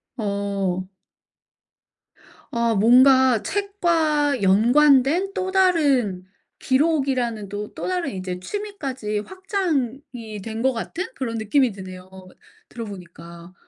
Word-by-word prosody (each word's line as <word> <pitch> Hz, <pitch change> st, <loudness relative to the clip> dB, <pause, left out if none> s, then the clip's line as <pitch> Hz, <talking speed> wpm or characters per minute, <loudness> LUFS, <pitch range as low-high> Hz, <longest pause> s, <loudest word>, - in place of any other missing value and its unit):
어. 200 Hz, -4 st, -2 dB, 1.6 s
어 235 Hz, -1 st, +1 dB
뭔가 255 Hz, +2 st, +5 dB
책과 325 Hz, -, 0 dB
연관된 275 Hz, -, +4 dB
또 375 Hz, -1 st, -3 dB
다른 285 Hz, -, +2 dB, 0.4 s
기록이라는 260 Hz, -, 0 dB
또 205 Hz, +1 st, -6 dB
또 -, -, -5 dB
다른 355 Hz, -7 st, -2 dB
이제 185 Hz, -1 st, -5 dB
취미까지 270 Hz, -, -4 dB
확장이 275 Hz, -, -4 dB
된 225 Hz, +1 st, -5 dB
것 265 Hz, -, +3 dB
같은 330 Hz, +10 st, -4 dB
그런 230 Hz, -4 st, -3 dB
느낌이 235 Hz, +4 st, +2 dB
드네요, 185 Hz, -1 st, -10 dB, 0.6 s
들어보니까. 175 Hz, -5 st, -10 dB
245 Hz, 205 characters per minute, -22 LUFS, 205-300 Hz, 1.6 s, 뭔가